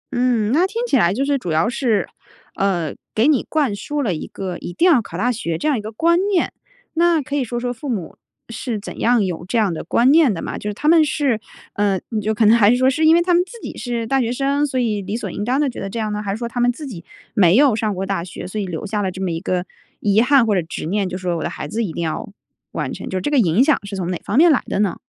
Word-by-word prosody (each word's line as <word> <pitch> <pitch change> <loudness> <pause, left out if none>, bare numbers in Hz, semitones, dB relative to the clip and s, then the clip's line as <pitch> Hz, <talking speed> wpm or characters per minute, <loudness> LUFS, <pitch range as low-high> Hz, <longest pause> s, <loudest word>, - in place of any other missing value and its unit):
嗯， 240 -4 +1
那 335 +8 +3
听 460 +5 -3
起 475 - +1
来 175 -9 +4
就 265 +6 -1
是 280 -1 +1
主 180 - -6
要 160 +1 +2
是， 235 -6 0 0.5
呃， 175 -6 0 0.2
给 225 +6 +3
你 295 -5 +3
灌 285 -9 +1
输 290 +7 -3
了 200 - 0
一 155 - -5
个 185 -3 -5
一 - - -6
定 335 - +1
要 265 -7 +5
考 170 -5 -8
大 245 +6 +1
学 170 -8 -3
这 170 - -2
样 300 - +3
一 - - -3
个 215 - -7
观 335 +9 +2
念。 380 -4 +1 0.4
那 335 0 +3
可 285 +2 -4
以 280 - +1
说 240 0 -3
说 245 0 -2
父 270 +4 -7
母 200 -9 -4 0.3
是 230 -1 -4
怎 200 - -9
样 235 -3 +3
有 175 -2 -4
这 235 - -1
样 210 -6 +2
的 160 - -5
观 240 +9 +3
念 305 -6 +5
的 170 - -4
嘛？ - - -5
就 210 - -4
是 - - -3
他 295 - -3
们 325 -1 +6
是， 280 -6 0 0.3
呃， 200 -2 +1 0.2
就 215 +2 -1
可 220 - +3
能 220 +2 +7
还 210 -3 +5
是 245 - +4
说 260 +1 +3
是 315 +4 +1
因 320 +1 +7
为 345 - +4
他 355 0 +2
们 350 +1 +4
自 470 +6 -12
己 - - -8
是 235 -3 -3
大 270 +3 +1
学 235 0 -1
生， 280 +3 0
所 260 -2 -2
以 215 -4 0
理 200 +3 -4
所 - - -5
应 205 - -4
当 255 +5 0
地 295 - +2
觉 255 - -5
得 195 - -4
这 205 - -6
样 215 -2 -2
呢？ 210 - -3
还 205 - -5
是 200 - -1
说 235 - -4
他 245 +1 -5
们 245 0 +3
自 295 +5 -8
己 200 -12 -8 0.3
没 185 -1 +5
有 270 -3 +5
上 215 -2 -1
过 190 +1 -3
大 195 -3 -2
学， 175 - -8
所 210 +3 -4
以 195 - -3
留 170 +2 -5
下 210 0 -2
了 190 - 0
这 185 - -8
么 190 -2 -1
一 165 - -2
个 180 +1 -2 0.3
遗 205 +1 +3
憾 265 -1 +4
或 215 - +1
者 185 - +2
执 165 -1 -6
念， 195 +2 -1
就 180 - -4
说 180 -2 -2
我 - - -4
的 - - -2
孩 - - -6
子 225 +9 -2
一 185 - -3
定 170 - -4
要 160 +4 -3 0.4
完 - - -3
成， - - -7
就 190 - -2
这 240 +11 -2
个 285 - +4
影 195 +2 +4
响 300 +1 +3
是 200 0 -6
从 185 -2 -3
哪 180 - -4
方 220 - -2
面 335 +2 +7
来 275 - +3
的 - - -2
呢？ 200 -4 +1
225 Hz, 320 characters per minute, -20 LUFS, 195-270 Hz, 0.5 s, 能